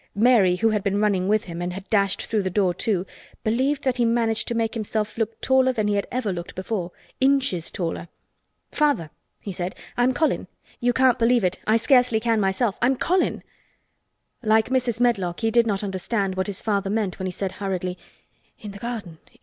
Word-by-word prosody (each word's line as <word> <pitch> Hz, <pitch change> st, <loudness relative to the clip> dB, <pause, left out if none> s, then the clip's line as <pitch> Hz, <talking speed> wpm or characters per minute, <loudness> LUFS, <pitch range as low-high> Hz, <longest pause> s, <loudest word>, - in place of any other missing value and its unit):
Mary, 210 Hz, -5 st, +5 dB
who 225 Hz, +5 st, +2 dB
had 210 Hz, -2 st, 0 dB
been 200 Hz, 0 st, 0 dB
running 200 Hz, -3 st, +1 dB
with 215 Hz, +1 st, +2 dB
him 170 Hz, -1 st, -7 dB
and 175 Hz, 0 st, -3 dB
had 190 Hz, +1 st, -8 dB
dashed 200 Hz, -3 st, +2 dB
through 220 Hz, -2 st, 0 dB
the 190 Hz, -, -2 dB
door 185 Hz, -1 st, +1 dB
too, 190 Hz, 0 st, -1 dB, 0.4 s
believed 260 Hz, +6 st, 0 dB
that 260 Hz, -2 st, 0 dB
he 240 Hz, -, +2 dB
managed 230 Hz, -1 st, +1 dB
to 235 Hz, -, -2 dB
make 225 Hz, -1 st, 0 dB
himself 215 Hz, -2 st, -2 dB
look 225 Hz, -1 st, -2 dB
taller 260 Hz, 0 st, +3 dB
than 215 Hz, -4 st, -1 dB
he 210 Hz, -, +1 dB
had 200 Hz, -1 st, -1 dB
ever 235 Hz, -6 st, -1 dB
looked 175 Hz, -1 st, -7 dB
before—inches 200 Hz, +3 st, -1 dB
taller. 170 Hz, -1 st, -4 dB, 0.6 s
"Father," 285 Hz, -, +1 dB, 0.3 s
he 200 Hz, -, -6 dB
said, 180 Hz, 0 st, -4 dB, 0.2 s
"I'm 245 Hz, +1 st, +3 dB
Colin. 310 Hz, +4 st, 0 dB, 0.3 s
You 245 Hz, 0 st, +2 dB
can't 255 Hz, 0 st, +3 dB
believe 235 Hz, -1 st, +3 dB
it. 180 Hz, 0 st, 0 dB
I 220 Hz, +1 st, +5 dB
scarcely 245 Hz, -1 st, +3 dB
can 225 Hz, -1 st, +1 dB
myself. 195 Hz, +2 st, 0 dB
I'm 255 Hz, +3 st, +3 dB
Colin." 365 Hz, +7 st, 0 dB, 1.0 s
Like 220 Hz, -1 st, +3 dB
Mrs. 250 Hz, -3 st, 0 dB
Medlock, 200 Hz, -8 st, +1 dB
he 225 Hz, -1 st, +1 dB
did 235 Hz, 0 st, +4 dB
not 200 Hz, -1 st, 0 dB
understand 195 Hz, +1 st, -1 dB
what 190 Hz, +1 st, -2 dB
his 200 Hz, -2 st, -3 dB
father 200 Hz, -2 st, 0 dB
meant 205 Hz, -3 st, -1 dB
when 185 Hz, -, -2 dB
he -, -, -3 dB
said 190 Hz, +1 st, -3 dB
hurriedly: 185 Hz, -2 st, -3 dB, 0.6 s
"In 210 Hz, -, -8 dB
the 200 Hz, -, -10 dB
garden! 210 Hz, -9 st, -6 dB
215 Hz, 195 wpm, -24 LUFS, 190-240 Hz, 1.0 s, Mary